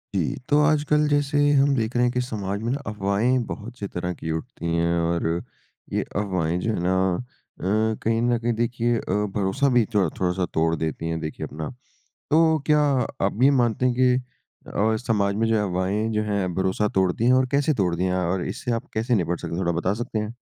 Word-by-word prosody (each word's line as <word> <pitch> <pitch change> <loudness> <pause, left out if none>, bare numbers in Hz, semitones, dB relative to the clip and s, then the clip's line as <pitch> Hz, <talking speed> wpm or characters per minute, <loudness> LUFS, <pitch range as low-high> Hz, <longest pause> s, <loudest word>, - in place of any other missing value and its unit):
जी। - - 0
तो 145 - +4
आजकल 150 0 +2
जैसे 145 0 +1 0.2
हम 140 0 +4
देख 115 -1 -1
रहे 120 - +3
हैं 120 - +1
कि 125 - +1
समाज 100 -4 -3
में 115 +2 -1
ना 140 - -1
अफ़वाहें 105 +4 +1
बहुत 115 +3 -7
सी 100 - -3
तरह 90 -1 -3
की 80 -1 -5
उठती 80 +1 -5
हैं। 85 0 +1
और 85 0 0 0.7
ये - - +1
अफ़वाहें 90 -4 0
जो 110 +4 -1
है - - -2
ना 90 +1 +2 0.6
अ, 110 +5 +1
कहीं 115 +1 +1
न 120 0 +2
कहीं 120 +1 0
देखिए 120 +1 0
अ, - - -4 0.2
भरोसा 105 +8 +1
भी 120 -2 +5
थोड़ 100 -4 +3
थोड़ा-सा 90 0 0
तोड़ 80 +1 +2
देती 80 0 -3
हैं 80 0 -2
देखिए 75 -1 -5
अपना। 75 +1 -6 0.6
तो 160 +1 +4
क्या 150 -1 +4 0.5
आप 100 - -3
ये 135 - +7
मानते 120 +1 +1
हैं 125 - +2
कि 125 0 +4 0.5
अ, 110 +3 +1
समाज 100 -4 +1
में 110 +2 +1
जो 110 -2 +2
अफ़वाहें 95 +4 -1
जो 105 0 +1
है 100 -2 0
भरोसा 95 +3 0
तोड़ती 95 +3 +1
है? 125 - +6
और 130 0 +3
कैसे 145 +2 +2
तोड़ती 90 -5 0
हैं 90 -1 0
और 90 0 -1
इससे - - -4
आप 115 - -3
कैसे 115 +3 +1
निपट 90 -4 0
सकते - - -5
हैं 85 - -2
थोड़ा 85 - +1
बता 95 +3 0
सकते 120 -2 -3
हैं? 105 +2 -4
105 Hz, 210 wpm, -24 LUFS, 90-120 Hz, 0.7 s, ये